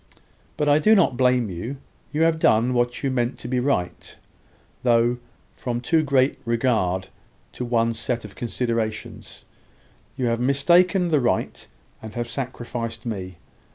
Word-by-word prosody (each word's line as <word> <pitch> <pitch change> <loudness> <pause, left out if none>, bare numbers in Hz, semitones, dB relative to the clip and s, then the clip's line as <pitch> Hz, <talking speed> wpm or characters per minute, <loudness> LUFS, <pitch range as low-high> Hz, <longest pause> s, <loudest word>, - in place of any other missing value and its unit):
"But 150 - 0
I 145 +1 +5
do 215 +8 +5
not 170 -10 +3
blame 125 -4 +2
you. 115 +11 -5 0.3
You 155 +2 +1
have 165 -1 +2
done 120 -2 +3
what 120 +1 0
you 135 - +1
meant 120 -1 -1
to - - -8
be 125 0 0
right; 125 -9 -2 0.7
though, 120 0 +3 0.3
from 120 -1 -3
too 160 +6 +2
great 140 -2 +2
regard 115 -6 0 0.4
to - - -6
one 115 -1 +1
set 115 0 -3
of 100 - -10
considerations, 115 -2 -4 0.7
you 130 - -1
have 115 -1 0
mistaken 175 +8 +3
the 155 -3 +3
right, 120 -2 -1 0.3
and 110 -1 -9
have 120 0 -2
sacrificed 120 -2 -5
me. 95 -5 -5
120 Hz, 150 wpm, -23 LUFS, 115-135 Hz, 0.7 s, I